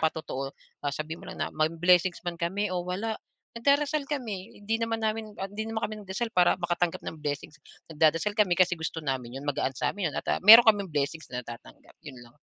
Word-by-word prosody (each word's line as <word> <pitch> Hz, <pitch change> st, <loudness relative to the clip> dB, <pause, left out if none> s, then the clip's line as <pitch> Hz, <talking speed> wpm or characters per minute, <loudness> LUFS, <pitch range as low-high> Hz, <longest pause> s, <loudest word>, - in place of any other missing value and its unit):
patotoo, 155 Hz, -4 st, -2 dB, 0.3 s
ah, 145 Hz, -1 st, -2 dB
sabihin 155 Hz, +2 st, -5 dB
mo -, -, -12 dB
lang -, -, -3 dB
na, -, -, -7 dB
"May 155 Hz, 0 st, +2 dB
blessings 175 Hz, +2 st, +2 dB
man 170 Hz, -1 st, -4 dB
kami 190 Hz, +3 st, -1 dB
o 180 Hz, -, 0 dB
wala, 215 Hz, +5 st, -3 dB, 0.3 s
nagdarasal 285 Hz, +5 st, +2 dB
kami, 220 Hz, -8 st, -4 dB, 0.2 s
hindi 225 Hz, +2 st, 0 dB
naman 230 Hz, 0 st, -1 dB
namin 220 Hz, 0 st, -2 dB
hindi 200 Hz, +3 st, -4 dB
naman 225 Hz, 0 st, -1 dB
kami 215 Hz, -, -7 dB
nagdasal 195 Hz, +4 st, -3 dB
para 180 Hz, +1 st, +4 dB
makatanggap 175 Hz, 0 st, -1 dB
ng 155 Hz, -2 st, -7 dB
blessings. 145 Hz, 0 st, -4 dB, 0.3 s
Nagdadasal 165 Hz, +6 st, +2 dB
kami 190 Hz, -5 st, +2 dB
kasi 185 Hz, -1 st, +4 dB
gusto 160 Hz, 0 st, -5 dB
namin 130 Hz, -4 st, -4 dB
yun, 145 Hz, -, -9 dB
magaan 145 Hz, -2 st, 0 dB
sa -, -, 0 dB
amin 190 Hz, -7 st, -1 dB
yun -, -, -12 dB
at, -, -, -6 dB
ah, -, -, 0 dB
meron 225 Hz, +4 st, +10 dB
kaming 205 Hz, -4 st, +4 dB
blessings 150 Hz, +2 st, -2 dB
na 125 Hz, -, -4 dB
natatanggap, 120 Hz, -1 st, -11 dB
yun 140 Hz, -4 st, -10 dB
lang." 120 Hz, 0 st, -15 dB
175 Hz, 210 wpm, -28 LUFS, 155-215 Hz, 0.3 s, meron